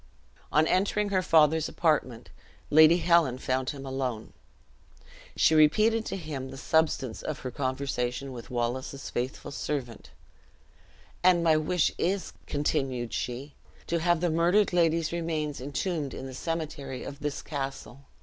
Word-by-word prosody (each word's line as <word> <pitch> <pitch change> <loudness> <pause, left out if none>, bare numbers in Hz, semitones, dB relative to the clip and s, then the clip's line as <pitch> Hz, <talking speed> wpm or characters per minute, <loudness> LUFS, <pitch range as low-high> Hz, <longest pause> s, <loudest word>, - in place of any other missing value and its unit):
On 155 +2 +4
entering 200 +4 +1
her 190 -2 +2
father's 160 -2 +4
apartment, 145 -8 0 0.4
Lady 155 +3 +7
Helen 170 -7 +3
found 130 0 -1
him 140 -2 -6
alone. 130 -4 -4 1.0
She - - +4
repeated 215 +9 +4
to - - -3
him 145 -6 -6
the 135 - -9
substance 150 -5 0
of 155 - -5
her 130 - -5
conversation 130 0 -2
with 120 -2 -9
Wallace's 125 +3 -3
faithful 125 +4 -4
servant; 135 -6 -4 1.1
"and 180 -1 +4
my 160 -2 +5
wish 155 +2 +1
is," 190 +2 -1
continued 130 -5 -1
she, 130 +4 -4 0.3
"to 170 - -1
have 175 0 +2
the 175 -2 +1
murdered 175 +5 +3
lady's 165 -2 +2
remains 160 -4 -2
entombed 145 +1 -3
in - - -7
the 130 - -7
cemetery 145 -3 -4
of 140 0 -8
this 150 -1 -4
castle." 135 -2 -6
150 Hz, 140 wpm, -28 LUFS, 130-165 Hz, 1.1 s, Lady